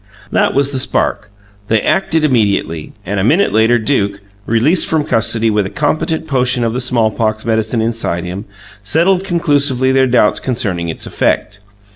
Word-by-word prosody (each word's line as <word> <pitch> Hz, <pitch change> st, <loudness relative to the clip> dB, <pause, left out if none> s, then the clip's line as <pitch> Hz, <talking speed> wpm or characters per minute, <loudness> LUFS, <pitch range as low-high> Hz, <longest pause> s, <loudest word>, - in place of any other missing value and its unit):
That -, -, +1 dB
was 140 Hz, 0 st, +1 dB
the 135 Hz, -, -2 dB
spark. 105 Hz, -5 st, -1 dB, 0.4 s
They 110 Hz, 0 st, +2 dB
acted 160 Hz, -, 0 dB
immediately; 100 Hz, -, 0 dB
and 100 Hz, +2 st, -2 dB
a -, -, 0 dB
minute 160 Hz, -, +2 dB
later 110 Hz, +2 st, +3 dB
Duke, 100 Hz, -4 st, -1 dB, 0.3 s
released 125 Hz, +11 st, +3 dB
from 160 Hz, -2 st, +1 dB
custody 115 Hz, -4 st, +1 dB
with 105 Hz, -2 st, 0 dB
a -, -, -8 dB
competent 160 Hz, +4 st, -1 dB
potion 130 Hz, -4 st, +1 dB
of 115 Hz, -1 st, -1 dB
the 125 Hz, -, -2 dB
smallpox 110 Hz, -3 st, 0 dB
medicine 110 Hz, 0 st, 0 dB
inside 110 Hz, -7 st, -2 dB
him, 90 Hz, +4 st, -6 dB, 0.4 s
settled 175 Hz, -, +1 dB
conclusively 145 Hz, -7 st, +1 dB
their 130 Hz, 0 st, +3 dB
doubts 120 Hz, -4 st, +2 dB
concerning 95 Hz, -9 st, -2 dB
its 80 Hz, -, -6 dB
effect. 105 Hz, +2 st, -1 dB
115 Hz, 160 wpm, -15 LUFS, 105-145 Hz, 0.4 s, later